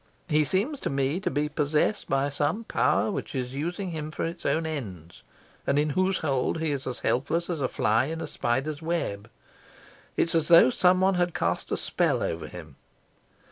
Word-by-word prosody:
He 155 -1 +4
seems 210 - 0
to - - -3
me 140 +4 0
to - - -1
be 145 +2 0
possessed 150 +7 0
by 135 +1 +1
some 155 +10 -1
power 215 - +1
which 195 - -5
is 125 -1 -3
using 175 +6 -3
him 155 -2 -4
for 155 - -4
its 165 +1 -4
own 160 0 +1
ends, 95 - -6 0.5
and 140 - +2
in 150 +1 +2
whose 185 +4 +1
hold 140 +1 0
he 160 -2 0
is 140 -2 -3
as 125 - -3
helpless 165 +7 0
as 160 -4 -3
a 130 - +2
fly 110 +2 +2
in 160 +3 -4
a - - -3
spider's 135 +6 -2
web. 115 -11 -2 0.9
It's 165 - +2
as 165 -2 +2
though 165 -6 +7
someone 185 +4 +4
had 175 -1 0
cast - - -1
a - - +1
spell - - 0
over 85 - -3
him. 80 -6 -11
150 Hz, 190 wpm, -27 LUFS, 135-170 Hz, 0.9 s, though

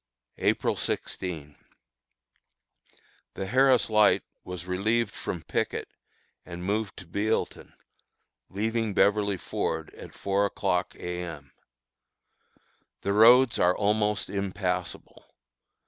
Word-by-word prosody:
April - - +1
16. 80 -6 -4 1.8
The 95 - -3
Harris 130 +4 +4
Light 105 -1 +4 0.2
was 90 -1 -7
relieved 105 +4 0
from 85 -3 -5
picket, - - -2 0.6
and 90 0 -8
moved 105 +1 -1
to 95 - -9
Bealeton, 100 +6 -2 0.8
leaving 110 +1 -1
Beverly 100 -1 +3
Ford - - -3
at - - -12
four 100 +1 +1
o'clock - - -1
A. 90 0 -5
M. 75 -6 -8 1.5
The 100 - 0
roads 120 +4 +6
are 90 +1 +3
almost 105 0 +1
impassable. 95 -3 -3
100 Hz, 100 wpm, -27 LUFS, 90-110 Hz, 1.8 s, roads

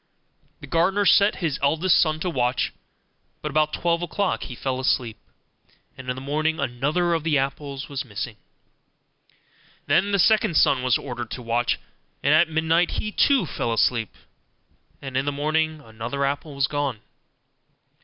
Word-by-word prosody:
The - - -8
gardener 180 +7 +1
set 200 +2 +5
his 145 -4 -1
eldest 160 +5 +3
son 155 -1 +1
to 180 - -1
watch; 125 - 0 0.7
but 150 - -3
about 155 +1 +2
twelve 170 +1 0
o'clock 195 +2 -1
he 125 - -8
fell 130 +1 -3
asleep, 120 -3 0 0.8
and 130 -1 -8
in 125 - -1
the 130 - -7
morning 155 +3 -1
another 145 +7 0
of 165 - 0
the 160 -3 +2
apples 140 0 -3
was 140 -2 -4
missing. 110 -2 -6 1.5
Then 185 +8 +2
the 200 - +3
second 195 -4 +3
son 130 - +4
was 125 -2 +2
ordered 120 -3 -6
to 125 - -6
watch; 120 +1 0 0.5
and 145 - +4
at 160 +2 +5
midnight 160 +2 +1
he 215 - -3
too 270 -1 +3
fell 120 -5 -3
asleep, 115 -2 +1 0.9
and 135 -1 -6
in 135 +1 +1
the 145 - 0
morning 155 +2 -1
another 115 +3 -4
apple 140 +1 -3
was 140 -1 +2
gone. 140 -6 -2
145 Hz, 160 wpm, -24 LUFS, 130-165 Hz, 1.5 s, set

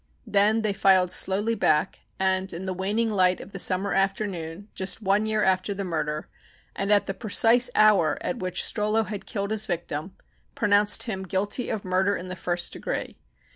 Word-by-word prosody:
Then 210 +2 +2
they 210 -2 0
filed 190 -2 +3
slowly 205 +5 +2
back 155 -8 +1 0.2
and, 190 0 0
in 175 +2 -6
the 190 - -2
waning 210 +5 -1
light 185 -3 +2
of 200 - -11
the 195 - -6
summer 190 +1 +2
afternoon 195 -2 -2
just 190 +3 -2
one 210 +1 +1
year 215 -1 0
after 190 +1 +1
the 200 - -4
murder, 155 -4 -3 0.5
and 200 +1 -2
at 205 -1 +4
the 195 - -3
precise 235 +4 +3
hour 210 -7 +4
at 250 - -4
which 185 -2 -1
Strollo 215 +1 0
had 205 0 -7
killed 200 0 -3
his 220 0 0
victim, 175 0 -4 0.4
pronounced 205 -1 +3
him 205 -5 -4
guilty 195 +5 -2
of 210 - -4
murder 190 +2 +1
in 180 - -7
the 185 - -5
first 175 0 -2
degree. - - -5
195 Hz, 180 wpm, -25 LUFS, 185-210 Hz, 0.5 s, at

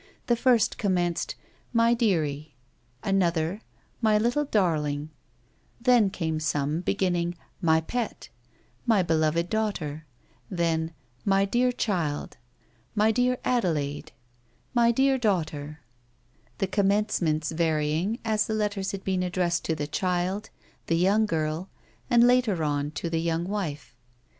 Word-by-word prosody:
The 240 - +3
first 235 -2 +2
commenced 175 -4 0 0.2
" - - -35
My 230 +1 +5
dearie; 155 - 0 0.2
" 120 +1 -38
another, 175 +1 +1 0.2
" - - -38
My 215 -2 +4
little 245 +7 +1
darling; 155 - 0 0.3
" 120 - -38
then 235 -5 +6
came 160 -5 -2
some 155 +1 -1
beginning, 175 -2 0
" - - -38
My 160 0 +4
pet 240 +8 -4 0.3
" - - -36
—"My 215 -5 +4
beloved 165 0 +1
daughter," 165 -9 -2 0.4
then 165 -2 0 0.3
"My 195 0 +3
dear 245 +5 +2
child"— 175 -11 -2 0.6
"My 215 +1 +4
dear 250 +2 +2
Adelaide 155 - 0 0.2
" 120 0 -38
— 120 - -38
" - - -39
My 235 -2 +4
dear 265 +2 +2
daughter," 155 -8 -1 0.8
the - - +1
commencements 195 -6 +1
varying 160 +5 0
as 215 -1 +1
the 220 - -1
letters 205 -2 -1
had 195 -1 -5
been 190 -1 0
addressed 175 -1 0
to 160 - 0
the 145 -1 -3
child, 180 +6 -1 0.4
the 165 - +2
young 200 +5 +3
girl, 160 +1 -2 0.4
and, 240 -1 +6
later 245 -9 +3
on, 145 -1 0
to 155 - -4
the 165 -1 -1
young 165 0 0
wife. 165 - -4
180 Hz, 145 wpm, -27 LUFS, 155-215 Hz, 0.8 s, then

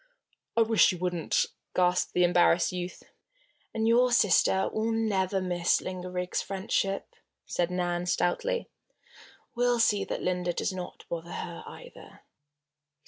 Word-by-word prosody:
"I 230 - +6
wish 225 -2 +4
you 180 - -5
wouldn't!" 175 -2 0 0.3
gasped 180 0 +2
the 180 - +4
embarrassed 175 0 +4
youth. 180 0 -6 0.7
"And 220 0 -1
your 245 +2 +4
sister 190 -4 +3
will 220 +1 0
never 200 -4 0
miss 175 -2 +1
Linda 185 -1 -6
Riggs' 180 0 -2
friendship," 195 0 -2 0.3
said 175 -1 -1
Nan, 175 -1 -2
stoutly. 470 - 0 0.9
"We'll 245 0 +1
see 210 -3 +3
that - - -4
Linda 180 -1 -1
does - - -2
not 180 -1 -8
bother 170 0 -5
her, 170 -1 -6
either." - - -13
185 Hz, 135 wpm, -28 LUFS, 180-220 Hz, 0.9 s, I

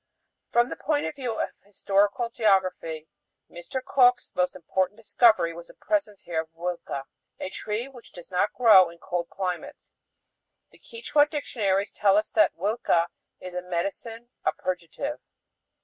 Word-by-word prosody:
From 240 +1 +3
the - - -4
point 295 -1 0
of - - -3
view 255 -5 -3
of - - -1
historical 205 +4 +1
geography, 185 -8 +1 0.4
Mr. 255 +10 -6
Cook's 250 -2 +4
most 180 0 0
important 185 +3 -1
discovery 220 -5 +3
was 170 0 -10
the - - -16
presence 220 -11 -1
here 165 -2 -1
of 160 - -13
huilca, 170 -5 -4 0.4
a 190 - -4
tree 215 +6 -3
which 255 -4 -14
does 175 +1 -12
not 180 +3 +1
grow 210 -7 +7
in 170 - -13
cold 175 0 -3
climates. 195 +10 -5 0.8
The - - -20
Quichua 305 -11 +1
dictionaries 205 -10 -1
tell 200 -1 +3
us 215 +1 0
huilca 195 - +2 0.3
is 185 -1 -8
a 180 - -3
"medicine, 200 +7 -4
a - - +2
purgative." 185 - -4
200 Hz, 150 wpm, -26 LUFS, 180-240 Hz, 0.8 s, grow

